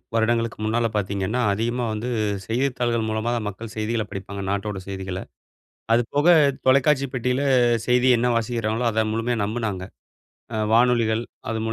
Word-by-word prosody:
வருடங்களுக்கு 115 0 +1
முன்னால 115 +2 +1
பாத்தீங்கன்னா, 100 +4 -1
அதிகமா 120 +4 -1
வந்து 110 +3 -4 0.4
செய்தித்தாள்கள் 120 -1 0
மூலமா 110 +2 -1
தான் 110 - -3
மக்கள் 110 +3 -8
செய்திகள 110 +1 -1
படிப்பாங்க. 100 +1 -6
நாட்டோட 100 0 -2
செய்திகள. 95 -1 -4 0.7
அதுபோக 140 +7 +1 0.4
தொலைக்காட்சி 140 +1 +4
பெட்டியில 125 +2 0 0.5
செய்தி 125 +1 +3
என்ன 125 +1 +1
வாசிக்கிறாங்களோ! 115 0 -1
அத 110 0 +1
முழுமையா 115 +2 -1
நம்புனாங்க. 105 -3 -2 0.7
அ - - -1 0.2
வானொலிகள் 115 -1 +3 0.3
அது 110 0 -2
115 Hz, 130 wpm, -23 LUFS, 110-120 Hz, 0.7 s, தொலைக்காட்சி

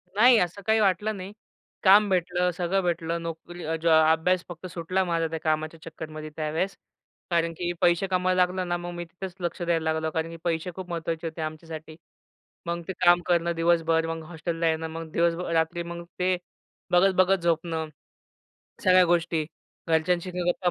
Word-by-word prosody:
नाही, 240 +2 +7
असं 180 +3 -1
काही 220 0 +3
वाटलं 205 +1 +1
नाही. 190 +2 -8 0.5
काम 205 +2 +7
भेटलं, 180 0 +1
सगळं 180 +2 0
भेटलं. 170 -1 -1
नोकरी 165 +1 -7 0.2
ज 170 - 0 0.2
अभ्यास 175 +2 +2
फक्त 175 +1 -9
सुटला 180 +2 -1
माझा 165 -2 0
त्या 160 0 -4
कामाच्या 155 +1 -1
चक्करमध्ये 155 -1 -8
त्यावेळेस. 160 +5 -2 0.6
कारण 170 -1 +1
की 175 +1 -2
पैसे 175 +2 +3
कमवायला 185 0 +2
लागलो 180 +1 +1
ना, 175 -1 -1
मग 175 0 -6
मी 175 - -5
तिथेच 180 +2 -8
लक्ष 175 +1 -3
द्यायला 170 -2 +1
लागलो. 160 0 -1
कारण 160 +1 -2
की 165 - -8
पैसे 170 +1 -1
खूप 185 -1 -7
महत्त्वाचे 165 -1 -3
होते 160 0 -6
आमच्यासाठी. 155 0 -6 0.7
मग 170 0 -2
ते 190 - -3
काम 175 0 +6
करणं 170 -1 +2
दिवसभर, 165 -1 +2
मग 165 0 -4
हॉस्टेलला 165 0 -2
येणं, 160 0 -1
मग 165 0 -6
दिवसभर 170 +1 0
रात्री 165 +1 +1
मग 170 0 -7 0.2
ते 180 0 +2 0.5
बघत-बघत 185 +1 +4
झोपणं, 165 -1 0 1.0
सगळ्या 185 0 +6
गोष्टी. 170 -2 +1 0.4
घरच्यांशी 170 +3 +1
गप्पा 175 0 +1
170 Hz, 165 wpm, -26 LUFS, 165-180 Hz, 1.0 s, नाही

